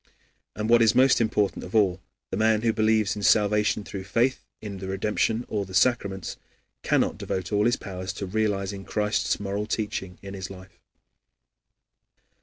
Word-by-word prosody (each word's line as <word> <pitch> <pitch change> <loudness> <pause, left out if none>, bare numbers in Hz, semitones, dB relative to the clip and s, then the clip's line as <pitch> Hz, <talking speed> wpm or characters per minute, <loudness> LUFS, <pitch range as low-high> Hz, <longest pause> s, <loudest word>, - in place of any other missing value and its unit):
And 105 0 -2
what 120 0 +5
is 110 -2 +4
most 130 -1 +5
important 105 -4 0
of 90 - -8
all 95 -4 +3 0.3
the - - -1
man 110 +1 +2
who 115 -1 +2
believes 110 -1 +2
in 105 - -6
salvation 105 0 +3
through 95 -1 -7
faith 120 +6 +1 0.2
in 100 -3 -7
the 95 - -6
redemption 105 +4 0
or 105 -2 -2
the 95 -1 -8
sacraments, 100 -4 +1 0.4
cannot - - +1
devote 95 +2 -3
all 105 0 +2
his 120 - +3
powers 95 -1 -6
to 100 - -5
realizing 100 -1 -1
Christ's 105 +1 0
moral 100 +1 -3
teaching 100 -5 -3
in 100 0 -7
his 95 -1 -6
life. 95 -2 -13
105 Hz, 165 wpm, -26 LUFS, 95-110 Hz, 0.4 s, what